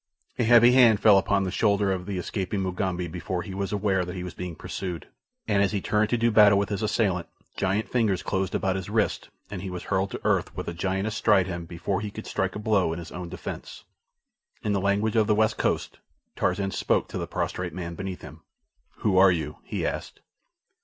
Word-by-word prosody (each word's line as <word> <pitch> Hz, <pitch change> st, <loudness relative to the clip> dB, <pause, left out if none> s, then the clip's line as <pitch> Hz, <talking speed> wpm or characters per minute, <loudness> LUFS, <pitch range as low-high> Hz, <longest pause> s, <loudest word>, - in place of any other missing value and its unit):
A -, -, +3 dB
heavy 120 Hz, +1 st, +7 dB
hand 120 Hz, -5 st, +6 dB
fell 105 Hz, -2 st, +6 dB
upon 100 Hz, +2 st, +1 dB
the 95 Hz, -, -2 dB
shoulder 100 Hz, 0 st, +2 dB
of 90 Hz, -1 st, -3 dB
the 100 Hz, -2 st, -3 dB
escaping 95 Hz, +2 st, -3 dB
Mugambi 90 Hz, -1 st, -2 dB
before 90 Hz, +1 st, -4 dB
he 95 Hz, -, -7 dB
was 100 Hz, 0 st, -3 dB
aware 100 Hz, -2 st, +1 dB
that 90 Hz, +1 st, -6 dB
he 90 Hz, -, -4 dB
was 90 Hz, -1 st, -6 dB
being 90 Hz, -2 st, -6 dB
pursued, 90 Hz, +2 st, -6 dB, 0.4 s
and 100 Hz, -2 st, +2 dB
as 100 Hz, +1 st, +1 dB
he 100 Hz, -, +1 dB
turned 105 Hz, +2 st, +1 dB
to 120 Hz, -, +1 dB
do 115 Hz, 0 st, +2 dB
battle 105 Hz, -2 st, +7 dB
with 100 Hz, 0 st, 0 dB
his 100 Hz, 0 st, -2 dB
assailant 100 Hz, -5 st, 0 dB, 0.3 s
giant 100 Hz, +3 st, 0 dB
fingers 110 Hz, -7 st, +1 dB
closed 95 Hz, 0 st, -1 dB
about 95 Hz, -1 st, 0 dB
his 95 Hz, 0 st, -4 dB
wrists 105 Hz, -1 st, 0 dB, 0.2 s
and 95 Hz, -3 st, -5 dB
he 95 Hz, -, -5 dB
was 90 Hz, -1 st, -6 dB
hurled 95 Hz, 0 st, 0 dB
to -, -, -6 dB
earth -, -, 0 dB
with -, -, -4 dB
a -, -, -3 dB
giant 95 Hz, +3 st, -1 dB
astride 105 Hz, -3 st, +3 dB
him 85 Hz, -2 st, -5 dB
before 90 Hz, +3 st, -3 dB
he 105 Hz, -, -4 dB
could 110 Hz, +1 st, -9 dB
strike 95 Hz, -2 st, -2 dB
a -, -, -3 dB
blow 105 Hz, -5 st, +1 dB
in -, -, -5 dB
his 85 Hz, -, -8 dB
own 90 Hz, -1 st, -6 dB
defence. -, -, -7 dB, 0.8 s
In 105 Hz, -, 0 dB
the 100 Hz, -, 0 dB
language 100 Hz, +3 st, +1 dB
of 110 Hz, -2 st, +3 dB
the 105 Hz, -, +3 dB
West 110 Hz, +1 st, +2 dB
Coast, -, -, -1 dB, 0.4 s
Tarzan 100 Hz, -1 st, 0 dB
spoke -, -, 0 dB
to -, -, -4 dB
the -, -, -4 dB
prostrate -, -, -3 dB
man 85 Hz, -2 st, -5 dB
beneath 95 Hz, +1 st, -6 dB
him. -, -, -11 dB, 0.6 s
"Who 95 Hz, -3 st, +3 dB
are 95 Hz, 0 st, +7 dB
you?" 80 Hz, -4 st, -3 dB
he -, -, -3 dB
asked. -, -, -4 dB
95 Hz, 220 wpm, -26 LUFS, 90-105 Hz, 0.8 s, heavy